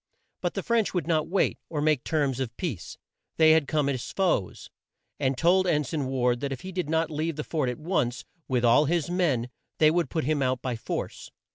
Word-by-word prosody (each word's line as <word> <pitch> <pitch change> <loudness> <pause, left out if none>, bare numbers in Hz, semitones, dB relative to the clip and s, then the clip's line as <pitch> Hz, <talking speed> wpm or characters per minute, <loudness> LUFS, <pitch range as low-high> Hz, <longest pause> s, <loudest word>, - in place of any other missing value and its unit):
But - - -2
the - - -2
French 230 -5 +1
would 175 - 0
not 155 -2 +1
wait, 195 +2 +1
or 155 - -3
make 150 -3 +2
terms 140 -5 0
of 130 -4 -4
peace. 155 - -5 0.4
They 160 -1 +6
had 160 -3 +4
come 150 -2 +1
as 130 -4 -2
foes, 180 - -1 0.5
and 135 -2 0
told 180 +5 +3
En 150 -4 +2
sign 140 0 -3
Ward 125 -2 +1
that 140 +1 -3
if 130 - -5
he 190 - -7
did 180 -4 -3
not 160 0 +1
leave 155 +1 -2
the 150 - -4
fort 150 -6 -1
at 125 - -4
once, 150 -7 -1 0.2
with 125 -3 +1
all 120 +6 +5
his 170 +1 0
men, 140 -10 0 0.3
they 155 -1 +5
would 170 -4 0
put 160 - -1
him 150 +1 0
out 130 -1 +1
by 125 -2 -3
force. 115 - -5
150 Hz, 220 wpm, -27 LUFS, 130-165 Hz, 0.5 s, They